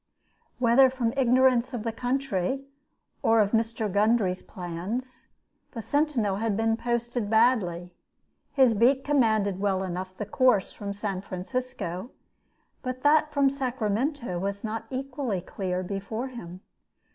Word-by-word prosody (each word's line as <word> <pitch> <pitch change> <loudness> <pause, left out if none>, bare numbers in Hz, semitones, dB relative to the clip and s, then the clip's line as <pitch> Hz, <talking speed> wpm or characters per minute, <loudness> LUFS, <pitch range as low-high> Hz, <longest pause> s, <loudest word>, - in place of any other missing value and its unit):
Whether 255 +2 +5
from 245 -3 -1
ignorance 255 -1 +3
of 225 - -4
the 230 - -1
country 255 0 -1 0.6
or 225 0 +4
of 205 -1 +3
Mr. 225 -1 0
Gundry's 205 -2 +2
plans, 190 +9 -6 0.5
the 230 - -5
sentinel 270 -10 +1
had 215 -1 -1
been 225 0 +2
posted 235 -1 -2
badly. 205 -7 +2 0.6
His 260 -4 +4
beat 255 +5 +3
commanded 220 -9 +2
well 195 -1 0
enough 185 0 -5
the 210 - -3
course 245 -2 +2
from 200 -1 -5
San 200 -2 -3
Francisco; 195 0 -4 0.7
but 255 0 -5
that 305 +1 +4
from 280 -2 +3
Sacramento 250 - -1
was 200 +2 -3
not 225 0 -4
equally 260 -5 -3
clear 185 0 -3
before 200 +6 -4
him. 185 -7 -9
225 Hz, 130 wpm, -27 LUFS, 195-255 Hz, 0.7 s, Whether